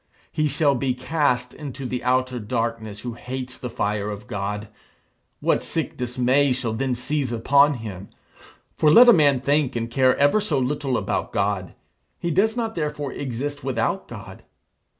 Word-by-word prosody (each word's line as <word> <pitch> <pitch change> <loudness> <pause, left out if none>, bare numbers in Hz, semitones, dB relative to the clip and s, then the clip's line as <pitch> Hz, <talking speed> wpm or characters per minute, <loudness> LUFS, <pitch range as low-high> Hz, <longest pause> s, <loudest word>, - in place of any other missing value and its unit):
He 155 0 +1
shall 145 0 +2
be 130 -1 -1
cast 125 -3 0
into 135 -2 -7
the 125 0 -3
outer 130 0 +1
darkness 115 -1 -3
who 120 -1 -5
hates 125 +1 -6
the 125 - -5
fire 105 -2 -2
of 105 +2 -7
God. 105 -2 -4 0.7
What - - +2
sick - - -3
dismay 125 +2 +2
shall 120 -3 -2
then 130 +2 -1
seize 135 +1 -2
upon 140 +5 +4
him! 100 -5 -8 0.7
For 155 - +3
let 240 +10 +8
a - - +9
man 145 -7 +4
think 140 -1 +1
and 115 0 -3
care 130 +1 +3
ever 145 +10 +4
so 165 -9 0
little 135 0 0
about - - -2
God, 100 -4 -1 0.4
he 170 - -2
does 220 +7 +2
not 225 -2 -2
therefore 150 -4 -3
exist 140 +3 -4
without 125 -4 -1
God. - - -10
130 Hz, 165 wpm, -23 LUFS, 115-145 Hz, 0.7 s, a